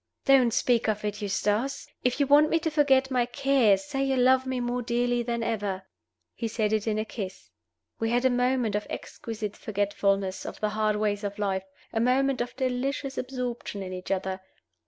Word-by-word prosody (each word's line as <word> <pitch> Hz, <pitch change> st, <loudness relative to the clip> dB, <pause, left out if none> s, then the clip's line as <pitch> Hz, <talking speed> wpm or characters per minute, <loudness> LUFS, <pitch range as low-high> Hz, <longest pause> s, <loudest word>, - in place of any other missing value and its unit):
"Don't 260 Hz, -3 st, +5 dB
speak 235 Hz, 0 st, +2 dB
of 210 Hz, 0 st, -1 dB
it, 210 Hz, +1 st, -3 dB
Eustace! 210 Hz, +6 st, -1 dB, 0.2 s
If 250 Hz, +2 st, +1 dB
you 285 Hz, -, +4 dB
want 290 Hz, +2 st, +6 dB
me 330 Hz, -, +3 dB
to 320 Hz, -, -1 dB
forget 270 Hz, -3 st, +3 dB
my 245 Hz, -2 st, +2 dB
cares, 265 Hz, -5 st, +3 dB
say 275 Hz, -2 st, -2 dB
you 270 Hz, -1 st, +1 dB
love 260 Hz, +1 st, +4 dB
me 260 Hz, -1 st, -1 dB
more 245 Hz, 0 st, -1 dB
dearly 245 Hz, 0 st, 0 dB
than 235 Hz, -1 st, -2 dB
ever." 205 Hz, -4 st, -2 dB, 0.5 s
He 230 Hz, -, -3 dB
said 215 Hz, -1 st, 0 dB
it 215 Hz, 0 st, 0 dB
in 215 Hz, -1 st, +1 dB
a 215 Hz, -, -1 dB
kiss. 195 Hz, -3 st, -7 dB, 0.5 s
We 225 Hz, -, 0 dB
had 245 Hz, +2 st, +1 dB
a 260 Hz, -, +5 dB
moment 245 Hz, -3 st, +1 dB
of 210 Hz, 0 st, -2 dB
exquisite 215 Hz, -3 st, -6 dB
forgetfulness 200 Hz, -2 st, -1 dB
of -, -, -7 dB
the 215 Hz, -, 0 dB
hard 215 Hz, 0 st, +1 dB
ways 210 Hz, 0 st, -1 dB
of 205 Hz, 0 st, -4 dB
life 190 Hz, -2 st, -1 dB, 0.3 s
a 225 Hz, -, +1 dB
moment 255 Hz, +2 st, +2 dB
of 240 Hz, -, -4 dB
delicious 265 Hz, +2 st, -2 dB
absorption 250 Hz, -5 st, -4 dB
in 185 Hz, -1 st, -6 dB
each 185 Hz, 0 st, -7 dB
other. 190 Hz, 0 st, -2 dB
235 Hz, 195 wpm, -27 LUFS, 210-260 Hz, 0.5 s, want